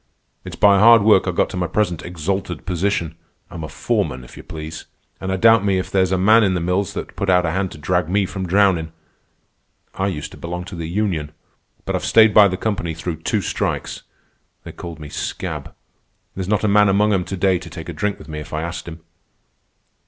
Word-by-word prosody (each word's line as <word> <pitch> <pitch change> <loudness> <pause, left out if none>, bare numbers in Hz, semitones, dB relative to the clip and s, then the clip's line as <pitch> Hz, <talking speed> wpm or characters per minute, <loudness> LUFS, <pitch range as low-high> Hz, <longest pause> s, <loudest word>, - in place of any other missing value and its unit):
It's - - -8
by 100 -1 +5
hard 115 0 +7
work 105 -3 +4
I - - +1
got 85 - +1
to 95 - -5
my 90 -1 -1
present 90 -2 -1
exalted 90 0 -4
position. 90 -2 -1 0.4
I'm 85 -3 -7
a - - -4
foreman, 65 -4 -2
if 60 - -14
you - - -9
please. 80 0 -8 0.3
An' 95 - -5
I 95 - 0
doubt 115 +1 +5
me 100 -2 +1
if 90 - -3
there's 95 -1 +2
a 95 - +2
man 110 +5 +5
in 95 -2 +2
the - - 0
mills 90 +3 -1
that'd - - -6
put 100 - -2
out 90 -1 +4
a 80 - 0
hand 95 +2 -1
to - - -11
drag 90 +2 0
me 100 +1 +2
from 95 -1 -5
drownin'. 90 -4 +2 1.0
I 95 - -1
used 80 -7 -4
to - - -12
belong 90 +1 -5
to 95 0 -9
the 85 -1 -5
union. 85 -6 -2 0.5
But - - -2
I've - - -2
stayed 110 -2 +5
by 105 -2 +8
the 95 -1 -3
company 90 -7 -2
through 80 0 -4
two - - 0
strikes. - - -3 0.6
They - - -8
called 85 -2 -8
me 75 -1 -9
'scab.' - - -5 0.6
There's 95 -1 -5
not 105 +1 +1
a - - +3
man 105 0 +5
among 105 +2 +3
'em 95 -2 +1
to 95 +1 -5
day 95 -1 +2
to 85 -1 -10
take 85 -2 -9
a 85 - -5
drink 100 +5 -2
with - - -13
me 75 -1 -6
if 75 - -10
I 80 +1 -2
asked 85 0 -6
him. 80 0 -9
90 Hz, 225 wpm, -20 LUFS, 85-100 Hz, 1.0 s, by